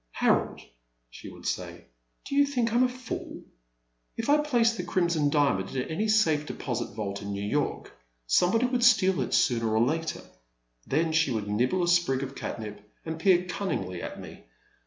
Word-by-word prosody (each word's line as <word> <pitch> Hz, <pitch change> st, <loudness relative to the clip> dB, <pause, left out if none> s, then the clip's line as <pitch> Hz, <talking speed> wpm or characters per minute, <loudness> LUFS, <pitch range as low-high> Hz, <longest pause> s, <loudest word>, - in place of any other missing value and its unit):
Harold," -, -, +1 dB, 0.5 s
she -, -, -10 dB
would -, -, -13 dB
say, -, -, -4 dB, 0.4 s
do -, -, -6 dB
you 285 Hz, 0 st, +5 dB
think 245 Hz, -5 st, -1 dB
I -, -, 0 dB
'm 245 Hz, -, +4 dB
a 255 Hz, -, +4 dB
fool? 250 Hz, -1 st, -7 dB, 0.7 s
If 230 Hz, -, -3 dB
I 300 Hz, -, +5 dB
place 240 Hz, -6 st, +2 dB
the 190 Hz, -, -3 dB
Crimson 170 Hz, -4 st, +1 dB
Diamond 140 Hz, -9 st, +1 dB
in 130 Hz, -1 st, -2 dB
any 205 Hz, +7 st, -1 dB
safe 160 Hz, -9 st, +2 dB
deposit 120 Hz, -4 st, -4 dB
vault 100 Hz, -2 st, -4 dB
in 100 Hz, 0 st, -5 dB
New 100 Hz, 0 st, -4 dB
York, 145 Hz, +8 st, -2 dB, 0.3 s
somebody 185 Hz, -, +3 dB
would 250 Hz, -1 st, 0 dB
steal 190 Hz, -7 st, +4 dB
it -, -, -3 dB
sooner 115 Hz, -7 st, +2 dB
or 115 Hz, -, +4 dB
later.*' 160 Hz, +4 st, -2 dB, 0.6 s
Then 160 Hz, +3 st, +1 dB
she 160 Hz, -2 st, +2 dB
would 110 Hz, -4 st, -2 dB
nibble 125 Hz, -, +1 dB
a -, -, 0 dB
sprig 175 Hz, -7 st, +2 dB
of 135 Hz, 0 st, -6 dB
catnip 105 Hz, -5 st, -6 dB, 0.2 s
and 160 Hz, 0 st, -5 dB
peer 180 Hz, 0 st, +4 dB
cunningly 95 Hz, -, -3 dB
at -, -, -6 dB
me. -, -, -11 dB
160 Hz, 180 wpm, -27 LUFS, -, 0.7 s, you